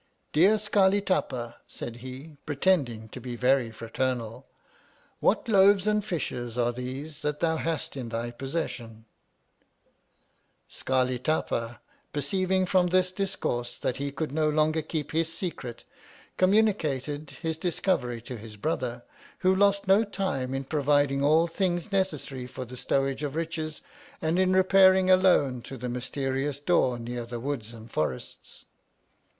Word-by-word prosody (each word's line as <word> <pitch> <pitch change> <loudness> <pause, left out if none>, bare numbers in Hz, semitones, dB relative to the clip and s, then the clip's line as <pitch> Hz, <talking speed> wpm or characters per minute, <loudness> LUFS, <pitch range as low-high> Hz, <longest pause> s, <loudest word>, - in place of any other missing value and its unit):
Dear 190 +8 +5
Scarli 205 -2 +3
Tapa, 120 -10 -1
said 120 0 -7
he, 130 +5 -9
pretending 140 -8 +1
to 125 - -9
be 120 0 -5
very 125 0 +2
fraternal, 115 +2 -3 0.7
what - - +2
loaves 200 -2 +5
and 210 0 +2
fishes 125 - -3
are 120 0 +2
these 130 +5 -6
that 150 -1 -2
thou 160 -1 +1
hast 160 -3 -3
in 125 -4 -5
thy 115 +1 -3
possession! 120 -5 -5 1.6
Scarli 130 -1 0
Tapa 120 -6 -1 0.3
perceiving 185 +6 +1
from 180 -1 +3
this 185 +1 +2
discoui 185 -10 -2
se 120 - -8
that 125 - 0
he 140 0 -3
could 155 0 -3
no 155 +1 +2
longer 155 +1 +2
keep 155 -1 -4
his 165 0 0
secret, 135 -9 -5 0.5
communicated 155 - +1
his 160 -1 0
discovery 160 - -1
to 125 0 -6
his 110 -1 -10
brother, 120 -2 -2 0.4
who 185 0 +5
lost 200 0 +3
no 195 +3 +6
time 185 - -2
in 135 - -2
providing 145 -1 +2
all 155 +3 +5
things 175 +2 -1
necessary 150 -9 -1
for 130 0 -7
the 125 +1 -10
stowage 135 +2 0
of 145 -1 -3
riches, 160 -1 -3 0.4
and 160 +3 0
in 185 0 +3
repairing 190 0 +5
alone 175 -9 +4
to 135 - -8
the 125 +1 -4
mysterious 135 +3 -2
door 145 -5 +2
near 120 +1 -5
the 120 0 -6
Woods 120 -4 -4
and 115 0 -12
Forests. 75 -4 -4
145 Hz, 145 wpm, -27 LUFS, 125-180 Hz, 1.6 s, no